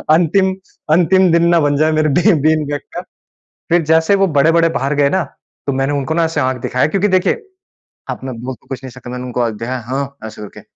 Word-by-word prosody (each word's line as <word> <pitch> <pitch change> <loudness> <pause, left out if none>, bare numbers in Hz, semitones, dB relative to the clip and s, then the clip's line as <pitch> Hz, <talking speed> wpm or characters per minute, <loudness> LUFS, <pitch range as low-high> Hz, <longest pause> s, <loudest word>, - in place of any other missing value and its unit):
अंतिम, 190 +3 +2 0.4
अंतिम 180 +2 +4
दिन 170 +1 +3
ना 170 -1 +4
बन 145 -1 +1
जाए 155 +2 +2
मेरे 155 0 +1
बी 175 +8 +3
बीन 155 0 +2
बैग 145 0 -3
का। - - -3 0.7
फ़िर 175 +1 +3
जैसे 160 +4 +4
वो 195 0 +2
बड़े-बड़े 165 +2 +3
बाहर 140 -3 -1
गए 140 - +4
ना 190 +4 +1 0.4
तो 140 - +1
मैंने 135 +2 -1
उनको 140 +2 -2
ना 165 +1 +1
ऐसे 160 -2 -2
आँख 130 -2 -1
दिखाया 130 +3 0
क्योंकि 195 +5 +1
देखिए 185 -2 +2 0.8
अब - - -4
मैं 130 -1 -5
बोल 130 +1 -5
तो - - -30
कुछ 135 -1 -7
नहीं 130 - -8
सका 125 0 -11
मैंने 125 0 -5
उनको 125 0 -3
आँख 115 -2 0
दिखाया 125 +4 -4
हाँ 140 +1 -4
ऐसे 110 -1 -9
करके, 105 - -10
150 Hz, 230 wpm, -16 LUFS, 130-170 Hz, 0.8 s, अंतिम